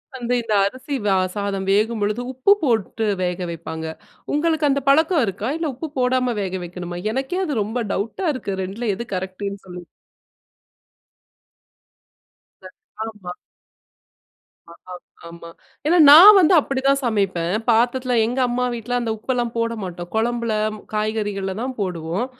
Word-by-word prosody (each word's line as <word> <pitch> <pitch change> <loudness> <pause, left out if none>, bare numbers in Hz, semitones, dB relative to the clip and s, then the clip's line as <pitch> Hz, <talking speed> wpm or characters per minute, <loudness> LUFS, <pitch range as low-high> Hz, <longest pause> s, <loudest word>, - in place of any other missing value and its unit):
வந்து 245 -1 -2
இந்த 230 -2 -3
அரிசி 255 +7 -4 0.4
சாதம் 200 -2 -3
வேகும்பொழுது 210 +2 +1
உப்பு 260 +9 +2
போட்டு 225 - 0 0.2
வேக 180 0 -2
வைப்பாங்க. 160 -1 -6 0.5
உங்களுக்கு 310 0 +1
அந்த 280 0 +1
பழக்கம் 315 0 +4
இருக்கா? 200 +4 -3
இல்ல 325 -3 -2
உப்பு 315 +6 -6
போடாம 250 -1 +1
வேக 190 -1 -3
வைக்கணுமா? 175 0 -7
எனக்கே 270 +9 -2
அது 280 - -1
ரொம்ப 230 +4 -3
டவுட்டா 225 - -3
இருக்கு. 255 -7 -4
2ல 210 +5 -4
எது 235 - -6
கரெக்ட்டுன்னு 190 +2 -5
சொல்லி. 180 -1 -9 2.8
அ, - - -6 0.4
ஆமா. 210 -5 -8 1.4
ஆ, - - -12 0.6
ஆமா. 170 0 -11 0.4
ஏன்னா 345 +3 +4
நான் 390 +8 +10
வந்து 360 +1 +5
அப்டிதான் 275 -1 +1
சமைப்பேன். 195 -7 0 0.2
பாத்தரத்தில 245 +2 +2
எங்க 245 +3 -3
அம்மா 250 +1 -1
வீட்ல 235 +2 -3
அந்த 230 -2 -2
உப்பெல்லாம் 240 +1 -2
போட 230 0 0
மாட்டோம் 175 -1 -7
கொழம்பில 235 0 0 0.4
காய்கறிகள்ல 205 -3 -2
தான் 260 0 -4
போடுவோம். 180 +3 -2
225 Hz, 130 wpm, -21 LUFS, 195-255 Hz, 2.8 s, நான்